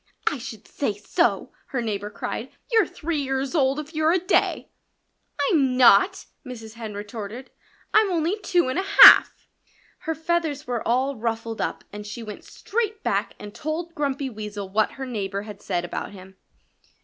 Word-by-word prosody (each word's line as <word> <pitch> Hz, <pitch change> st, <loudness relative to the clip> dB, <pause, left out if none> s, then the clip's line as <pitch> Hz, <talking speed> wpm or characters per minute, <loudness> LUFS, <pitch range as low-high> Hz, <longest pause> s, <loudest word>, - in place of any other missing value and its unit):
"I 290 Hz, -, 0 dB
should 230 Hz, -4 st, -9 dB
say 220 Hz, -8 st, -2 dB
so!" 335 Hz, -, 0 dB, 0.2 s
her 265 Hz, -, -3 dB
neighbor 210 Hz, -3 st, -3 dB
cried. 225 Hz, +4 st, -5 dB, 0.2 s
"You're 445 Hz, -6 st, +4 dB
three 320 Hz, -1 st, -3 dB
years 270 Hz, +1 st, -2 dB
old 275 Hz, -4 st, +2 dB
if 300 Hz, +2 st, -8 dB
you're 310 Hz, +1 st, +2 dB
a 360 Hz, -, +3 dB
day!" 365 Hz, +3 st, 0 dB, 0.8 s
"I'm 270 Hz, -6 st, +2 dB
not!" 255 Hz, -, +5 dB, 0.2 s
Mrs. 225 Hz, -5 st, -9 dB
Hen 225 Hz, -3 st, -7 dB
retorted. 210 Hz, +4 st, -7 dB, 0.4 s
"I'm 430 Hz, -2 st, +4 dB
only 345 Hz, +4 st, 0 dB
two 355 Hz, -6 st, +1 dB
and 260 Hz, +7 st, -1 dB
a 385 Hz, -, -2 dB, 0.2 s
half." -, -, +8 dB, 0.5 s
Her 320 Hz, -1 st, -3 dB
feathers 320 Hz, -3 st, -1 dB
were 245 Hz, -2 st, -2 dB
all 260 Hz, +3 st, +1 dB
ruffled 225 Hz, 0 st, -3 dB
up -, -, -3 dB
and 210 Hz, 0 st, -7 dB
she 230 Hz, +3 st, -7 dB
went 210 Hz, -2 st, -9 dB
straight 440 Hz, 0 st, -3 dB
back -, -, -1 dB
and 205 Hz, 0 st, -10 dB
told 330 Hz, +3 st, -4 dB
Grumpy 280 Hz, -4 st, -2 dB
Weasel 210 Hz, -2 st, -6 dB
what 215 Hz, +2 st, +1 dB
her 270 Hz, -, -6 dB
neighbor 200 Hz, -5 st, -4 dB
had 210 Hz, -2 st, -10 dB
said 175 Hz, -2 st, -2 dB
about 175 Hz, -, -5 dB
him. 190 Hz, 0 st, -13 dB
255 Hz, 170 wpm, -24 LUFS, 215-320 Hz, 0.8 s, half